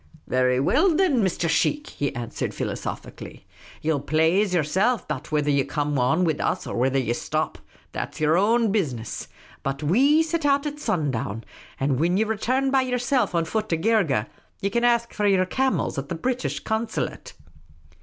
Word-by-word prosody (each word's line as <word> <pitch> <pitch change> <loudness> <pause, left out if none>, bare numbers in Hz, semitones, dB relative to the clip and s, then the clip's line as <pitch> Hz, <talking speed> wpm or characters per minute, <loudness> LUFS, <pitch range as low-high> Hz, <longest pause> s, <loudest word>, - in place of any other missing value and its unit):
" - - -35
Very 125 0 +2
well, 315 - +3
thin, 360 -8 +3
Mr. 185 -3 0
Sheikh," 295 - +1
he 140 - -2
answered, 120 -1 -4
philosophically. - - -6 0.4
Ye 160 - +1
'11 145 -3 -2
plaze 165 +6 +3
yerself 190 - +1
about 150 -2 -6
whether 150 -1 +1
ye 140 -1 +3
come 145 -1 -1
on 160 +9 +2
wid 160 -4 0
us - - -1
or - - -5
whether 130 +3 +1
ye 125 -3 0
shtop. - - -2 0.3
That - - -5
's - - -10
j 155 - 0
er 155 +2 +4
own 220 +3 +3
business. 130 - -2 0.3
But 135 0 -2
zve 260 - +3
set 325 0 -2
out 280 0 +2
at 295 0 -4
sun 175 - 0
down; 115 -2 -4 0.4
and 135 -1 +1
whin 175 +4 +2
ye 215 - +3
return 250 +5 0
by 270 -1 +4
yerself 250 -5 0
on 165 -1 +2
foot 215 +5 -2
to 165 - +1
Geergeh, 165 - +2 0.3
ye 200 - -1
can 235 +3 0
ask 235 -1 +2
for 210 -1 0
yer 190 -2 +3
camels 260 - 0
at 140 +2 -7
the 170 - -2
British 255 +8 -2
Consulate." 220 +1 -3
185 Hz, 190 wpm, -24 LUFS, 145-240 Hz, 0.4 s, er